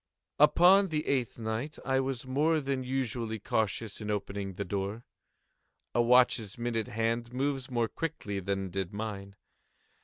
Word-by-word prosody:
Upon 180 +6 +7
the 155 -3 -2
eighth 130 -4 0
night 115 +6 -3
I 135 -1 +2
was 135 -2 -2
more 150 +5 +2
than 135 -2 -2
usually 120 -4 -2
cautious 110 +1 -2
in 105 - -4
opening 100 -1 -3
the 100 - -3
door. 100 +4 -3 0.9
A 120 - +3
watch's 120 -3 +4
minute 120 -2 -1
hand 115 +2 -1
moves 135 0 -1
more 120 -2 +1
quickly 105 -9 -4
than 95 0 -2
did 95 +1 -3
mine. 100 -2 -5
115 Hz, 145 wpm, -30 LUFS, 105-135 Hz, 0.9 s, Upon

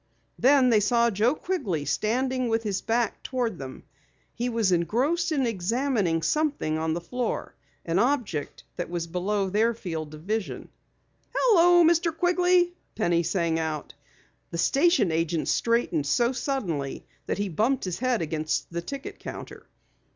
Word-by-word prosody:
Then 265 -1 +5
they 220 - +5
saw 235 +3 +3
Joe 225 +7 +2
Quigley 205 - -2
standing 255 - 0
with 225 0 0
his 200 -3 -2
back 230 -1 0
toward 240 -8 -2
them. 130 -1 -8 0.5
He 245 +1 -2
was 225 -5 +1
engrossed 265 - +1
in 280 -4 +1
examining 210 - 0
something 285 - 0
on 160 0 -1
the 175 - -3
floor, 245 +8 -3 0.3
an 170 +2 +1
object 235 - -1
that 175 - -3
was 170 -1 -3
below 190 +4 -1
their 225 +3 +2
field 160 -7 -5
of 155 - -12
vision. 215 +2 -3 0.7
"Hello, 350 -7 +5
Mr. 335 0 +2
Quigley!" 355 0 +3 0.2
Penny 175 -6 +2
sang 170 -1 0
out. 155 -2 -4 0.6
The 170 - -5
station 275 - +3
agent 165 0 0
straightened 230 -11 +1
so 235 - +2
suddenly 205 - -3 0.2
that - - -1
he 205 0 -1
bumped 225 - 0
his 180 -2 -3
head 250 -6 +1
against 155 +1 -2
the 170 - -2
ticket 275 +10 -7
counter. - - -9
220 Hz, 150 wpm, -26 LUFS, 170-260 Hz, 0.7 s, Then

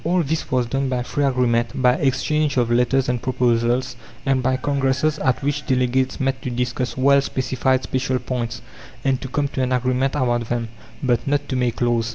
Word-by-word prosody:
All 175 +1 +2
this 155 +2 -2
was 125 -1 +1
done 135 +3 -1
by 125 -1 -1
free 145 +3 -1
agreement, 120 -3 +1
by 125 -1 +5
exchange 140 +2 0
of 120 -2 +2
letters 125 +2 +2
and 125 -1 -1
proposals, 120 0 +1 0.3
and 135 -2 +2
by 130 +1 +1
congresses 140 +2 0
at 130 0 0
which 145 +1 -1
delegates 130 0 +1
met 135 -1 -1
to - - -4
discuss 125 +1 -2
well 140 +1 +5
specified 130 -1 0
special 130 0 -1
points, 120 -2 -4 0.4
and 135 -2 +1
to 130 - -5
come 140 +2 -1
to 130 - -3
an 130 0 0
agreement 130 +2 +1
about 120 -4 0
them, 120 -1 -2 0.3
but 125 +2 +1
not 145 0 0
to 130 - -1
make 125 -2 -1
laws. 120 -1 +1
130 Hz, 195 wpm, -21 LUFS, 125-135 Hz, 0.4 s, by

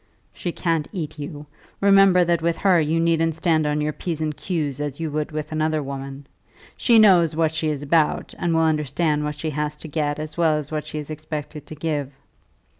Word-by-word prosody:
"She 175 - -4
can't 165 -3 -1
eat 155 -6 -5
you. 145 0 -7 0.3
Remember 195 -2 +6
that 170 -1 +1
with 165 0 0
her 185 -3 +4
you 160 +2 +1
needn't 165 -1 +2
stand 160 -2 +1
on 150 0 0
your 150 0 -1
p's 165 -1 -4
and 155 -1 -2
q's, 150 -7 -3
as 145 -1 -4
you 160 -2 -3
would 150 +1 -2
with 155 0 -5
another 155 -1 0
woman. 135 0 -7 0.5
She 235 -2 +4
knows 180 -7 +6
what 160 -1 +2
she 160 0 -2
is 145 -1 -3
about, 155 +1 +1
and 175 - 0
will 165 0 +3
understand 150 0 +1
what 150 0 -3
she 155 +2 -3
has 150 0 -2
to 160 - -9
get 145 -1 -1
as 155 +1 -6
well 160 -3 +3
as 150 -1 -6
what 155 -1 -3
she - - -5
is 150 0 -6
expected 150 -1 -6
to 155 - -8
give. 150 -3 -2
155 Hz, 210 wpm, -23 LUFS, 150-165 Hz, 0.5 s, Remember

